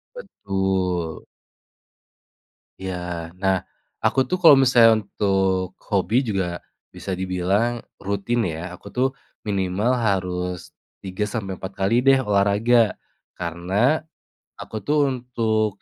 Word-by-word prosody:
Betul. 95 - -2 1.5
Iya. 95 -1 -4 0.5
Nah, 95 0 +3 0.5
aku 135 - +3
tuh 185 - 0
kalau 160 -4 +10
misalnya 120 -3 +6
untuk 95 -2 0 0.2
hobi 100 +3 +1
juga 90 -4 -2 0.3
bisa 95 - -7
dibilang 95 +6 0 0.2
rutin 100 +4 -1
ya, 85 +2 -5
aku - - -20
tuh 130 +1 +2 0.4
minimal 100 +4 0
harus 90 -5 -2 0.3
3 95 +2 -3
sampai 100 -4 -4
4 95 +1 -6
kali 95 +4 0
deh 135 0 +6
olahraga. 105 +2 +3 0.4
Karena 90 - 0 0.6
aku - - -9
tuh 150 +1 +2
untuk 115 -4 -1
100 Hz, 105 wpm, -23 LUFS, 95-115 Hz, 1.5 s, kalau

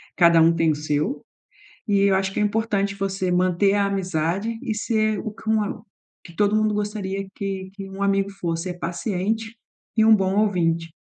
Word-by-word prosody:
cada 170 -2 +6
o 165 +1 +5
tem 165 -1 +3
o - - -1
seu. 150 - -2 0.6
E 200 -2 +2
eu 200 -1 +4
acho 190 0 0
que - - -4
é - - +3
importante 205 -2 0
você 195 -2 -2
manter 185 +2 +2
a 200 -1 +2
amizade 195 +3 -1
e 220 - -2
ser 215 -1 0
o 220 - -4
que 220 - -10
um 220 -1 +3
a 205 - -2
o 210 - -9 0.5
que 170 - -15
todo 205 0 +2
mundo 215 -1 +2
gostaria 205 -2 -3
que 195 -2 -4
que 195 -1 -8
um 195 +1 -6
amigo 195 0 +1
fosse, 175 -3 -3
é - - -2
paciente 215 +5 -2 0.4
e 220 - +5
um 220 0 +7
bom 195 -1 +1
ouvinte. 170 -5 +1
195 Hz, 200 wpm, -23 LUFS, 180-210 Hz, 0.6 s, um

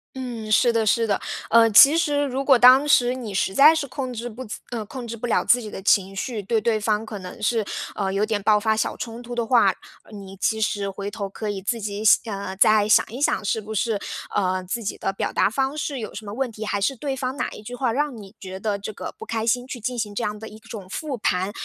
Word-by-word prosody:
嗯， 240 -4 -6
是 235 +2 +4
的 225 -1 +1
是 230 +2 +3
的， 205 -3 -1 0.3
呃， 230 0 +6
其 220 +8 +8
实 295 -3 +1
如 270 0 -2
果 270 -2 +5
当 255 +4 +7
时 245 -4 +4
你 245 -5 -6
实 190 0 0
在 300 +8 +7
是 310 -3 -1
控 255 0 -5
制 240 0 -5
不 240 +2 -8 0.3
呃， 230 -3 -3
控 245 +3 -8
制 230 - -5
不 230 +2 -5
了 235 - +1
自 245 - +4
己 215 - -7
的 195 - -8
情 195 -1 +2
绪， 220 +2 -3
对 220 +3 0
对 220 0 0
方 210 +1 0
可 215 -2 -7
能 180 -1 -9
是， 225 0 +1 0.3
呃， 195 -2 -2
有 200 +2 +1
点 215 -2 -2
爆 210 +1 +4
发 220 +1 +1
小 215 - -2
冲 230 0 -6
突 245 0 -7
的 235 -1 -1
话， 230 -3 +4 0.4
呃， - - -20
你 195 -2 -10
其 220 +3 0
实 205 -2 -1
回 200 +1 -6
头 200 -1 -5
可 210 +2 -5
以 200 -2 -4
自 230 +4 -2
己 205 0 -4
想 200 -3 +2
再 215 +1 +4
想 - - +5
一 245 +5 -7
想， 215 -8 +1
是 220 - 0
不 215 +1 -7
是， 215 0 0 0.3
呃， 185 -2 0
自 205 +6 -4
己 205 - -4
的 195 - -2
表 - - -2
达 - - +2
方 265 +6 -1
式 285 -2 -3
有 220 - -6
什 220 - -7
么 205 - -6
问 255 +1 -2
题， 215 0 -7
还 205 -1 -2
是 270 +7 +1
对 275 +1 -3
方 260 0 -4
哪 - - -2
一 - - -10
句 240 +4 -8
话 250 -2 0
让 285 -1 -1
你 200 -2 -12
觉 190 -2 -8
得 205 -1 -2
这 200 - -6
个 - - -7
不 - - -10
开 225 -1 -2
心， 245 +2 0
去 255 - -6
进 240 +2 -3
行 210 -2 -3
这 - - -2
样 210 0 -3
的 220 - -8
一 215 - -12
种 220 -4 -10
复 290 +3 -4
盘。 185 0 0
220 Hz, 285 characters per minute, -23 LUFS, 205-245 Hz, 0.4 s, 其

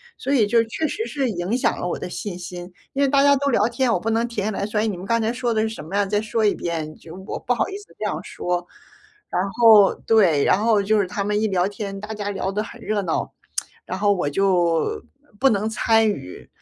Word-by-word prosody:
所 270 - -4
以 240 -7 +4
就 230 +2 +3
确 305 +8 -2
实 445 +8 -3
是 275 -3 -1
影 185 +6 -1
响 - - 0
了 175 - -2
我 - - -2
的 - - -5
信 180 0 -5
心。 175 0 -8 0.2
因 275 - -1
为 280 - +4
大 280 0 +4
家 285 0 +6
都 280 +1 0
聊 220 -3 +3
天， 245 +1 0
我 180 - +1
不 225 +4 -2
能 230 +1 +1
停 215 -4 -3
下 215 - 0
来 200 0 -2
说， 210 0 -1
哎， 215 - +1
你 210 -4 -1
们 175 - -9
刚 230 +4 +1
才 225 +1 0
说 245 -1 -1
的 220 -1 +1
是 220 - 0
什 220 - -8
么 175 +6 -6
呀？ 205 0 +2
再 205 +1 0
说 220 0 0
一 205 - +4
遍， 160 -3 -4
就 165 0 -12
我 - - -4
不 245 - 0
好 - - 0
意 390 - -5
思 410 - -13
这 - - -4
样 - - -2
说。 175 0 -3 0.6
然 180 - 0
后 220 -3 +6
对， 185 -11 +3
然 205 - +3
后 220 -3 +3
就 215 +1 +2
是 190 - -2
他 200 +2 -3
们 210 +1 0
一 220 - +2
聊 185 -1 +1
天， 200 -1 -6
大 210 +2 -6
家 205 -1 -4
聊 195 -1 -2
得 210 +2 -1
很 235 +2 -11
热 215 -2 -1
闹， 170 -4 -2 0.5
然 185 - -4
后 205 0 +3
我 175 -7 -1
就， 185 - +1 0.4
不 270 0 +5
能 210 0 +1
参 225 0 +3
与， 145 - -5
210 Hz, 280 characters per minute, -22 LUFS, 190-230 Hz, 0.6 s, 家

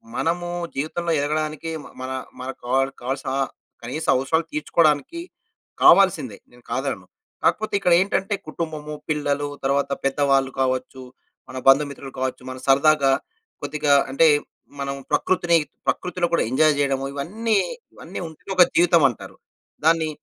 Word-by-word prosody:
మనము 175 +1 -1 0.3
జీవితంలో 165 +4 -2
ఎదగడానికి 155 +2 -2
మ - - -11
మన, 130 0 -5 0.3
మన 130 - -5
కావల్ 135 +2 +1
కావాల్సిన 135 +2 -3 0.5
కనీస 130 +7 -4
అవసరాలు 160 +6 +1
తీర్చుకోవడానికి 155 - +1 0.6
కావాల్సిందే, 155 - +5
నేను 120 0 -20
కాదనను. 130 -9 -3 0.4
కాకపోతే 215 0 +1
ఇక్కడేంటంటే, 190 +2 +2
కుటుంబము, 155 -2 -5 0.2
పిల్లలు 145 -1 0 0.2
తరువాత 140 +1 +1
పెద్దవాళ్ళు 135 -1 +2
కావచ్చు, 130 0 -2 0.5
మన 130 - -7
బంధుమిత్రులు 140 0 +3
కావచ్చు, 130 0 -2
మనం 130 0 -8
సరదాగా 140 0 +4 0.5
కొద్దిగా 150 -1 +1 0.2
అంటే, 160 +4 +5 0.5
మనం 140 0 -3 0.2
ప్రకృతిని, 175 -2 +2 0.3
ప్రకృతిలో 180 -1 0
కూడా - - +3
ఎంజాయ్ 155 +3 +4
చేయడము 135 -1 0
ఇవన్నీ, 210 +11 -1 0.4
ఇవన్నీ - - -8
ఉంటేనే 160 +4 -11
ఒక 180 - +9
జీవితమంటారు. 165 - +3 0.5
దాన్ని 160 -1 +3
145 Hz, 120 wpm, -23 LUFS, 135-165 Hz, 0.6 s, ఒక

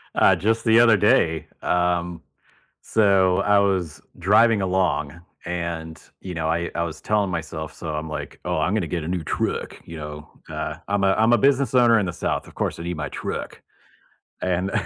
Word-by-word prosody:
uh, 95 - +5
just 110 +7 0
the 115 +1 +5
other 115 -3 +6
day, 80 -6 +2
um, 90 -1 0 0.7
so, 95 -4 +3
I 105 0 +3
was 90 -6 0 0.2
driving 105 +3 +4
along, 90 -5 0 0.3
and, 85 -2 -4 0.2
you 90 -2 -7
know, 80 -1 -2
I 85 +1 -1
I 85 - 0
was 80 -2 -6
telling 105 -3 0
myself - - -5
so - - -7
I'm 75 +1 -4
like, 75 - -6
"Oh, 90 -1 -1
I'm 80 +5 0
gonna 105 -5 0
get 85 -1 -3
a - - -5
new 90 -2 -2
truck," - - -2
you 85 - -9
know, 75 0 -8 0.2
uh, - - -4
I'm 100 0 0
a 95 - +4
I'm 110 +3 +3
a - - +6
business 140 +2 +2
owner 120 -2 +6
in 100 - 0
the 85 - -4
South, - - -2
of - - -14
course, - - -2
I 85 - -6
need 85 -1 -4
my 75 - -4
truck. - - -6 0.8
And 90 +1 -1
90 Hz, 195 wpm, -23 LUFS, 80-100 Hz, 0.8 s, other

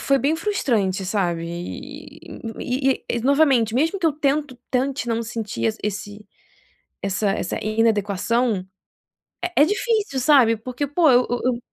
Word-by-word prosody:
foi 275 -1 +2
bem 285 +4 +1
frustrante, 230 - 0
sabe 180 -4 -1
e 170 +1 -8 0.4
e 265 +2 0
e - - -9
e - - -1
novamente, 265 -4 +3
mesmo 325 +9 +1
que 340 - +1
eu 310 - +3
tento 290 -2 -1
tente 265 0 -1
não 230 0 0
sentir 220 - -4 0.2
esse 210 0 -5 0.8
essa 195 +1 0
essa 190 - -2
inadequação 215 -1 +1 0.8
é 355 - -1
é - - +8
difícil, 415 - 0
sabe 255 -4 +5
porque 250 +5 -4
pô, 305 +1 +3
eu 250 0 +4
eu 245 - -1
eu 250 -1 +1
245 Hz, 150 wpm, -22 LUFS, 210-280 Hz, 0.8 s, é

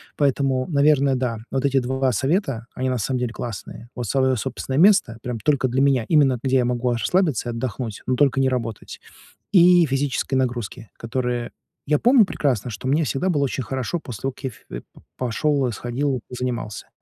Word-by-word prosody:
Поэтому, 135 -2 +1
наверное, 140 -3 +3
да, 125 -3 -2
вот 135 +1 -1
эти 135 -1 +3
2 130 +1 0
совета, 135 - 0
они 130 0 -2
на 130 - 0
самом 125 +3 -1
деле 120 -2 -2
классные. 115 +1 -7
Вот 120 - -5
свое 130 +1 +2
собственное 130 +2 -4
место 180 - +4
прям 125 -2 -4
только 135 +2 +2
для 130 +2 0
меня, 135 -4 +3
именно 140 -6 +3
где 135 0 +2
я 125 - +2
могу 125 0 0
расслабиться 145 - 0
и - - -1
отдохнуть, 115 -2 -5
но 130 - +2
только 135 0 +2
не 135 - +3
работать, 115 -5 -4 0.5
и 180 -2 +6
физические 135 -1 -1
нагрузки, 120 -2 -3
которые 120 0 -3 0.3
Я 150 +1 +2
помню 245 0 +6
прекрасно, 130 - -1
что 115 +3 -6
мне 150 +4 +2
всегда 145 +4 -1
было 145 -5 +1
очень 135 -1 -2
хорошо 130 +7 -3
после 120 -10 -9
того, 135 - -1
как 130 - -18
я 130 - 0
фе - - -10 0.3
пошёл 135 +2 0
и 120 - -3
сходил, 130 +6 -2
и - - -3
позанимался. 125 -4 -4
130 Hz, 190 wpm, -22 LUFS, 120-140 Hz, 0.5 s, и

